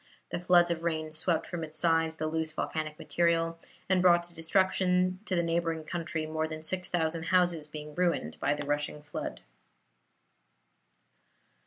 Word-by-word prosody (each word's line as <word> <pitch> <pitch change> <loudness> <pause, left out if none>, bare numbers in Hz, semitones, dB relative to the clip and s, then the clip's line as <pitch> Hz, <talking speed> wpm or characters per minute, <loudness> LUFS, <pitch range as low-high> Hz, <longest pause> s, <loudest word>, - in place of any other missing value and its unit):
The - - -2
floods 175 -1 +5
of 165 -1 -2
rain 160 -2 -2
swept 160 +1 0
from 175 -2 -5
its 155 0 -6
sides 165 -1 +2
the 155 - -3
loose 160 0 -1
volcanic 155 -1 -3
material, 165 -1 +1 0.3
and 185 -1 +3
brought 175 -1 +5
destruction 185 +2 +2
to 190 - 0
the 170 - +2
neighboring 165 -1 0
country, 165 -1 -3
more 160 0 -1
than 155 0 -7
six 180 +2 -2
thousand 165 -1 0
houses 175 -4 +2
being 150 0 -8
ruined 170 - 0
by 145 - +1
the 145 0 -5
rushing 145 +1 -2
flood. 145 - -5
165 Hz, 155 wpm, -30 LUFS, 155-175 Hz, 0.3 s, floods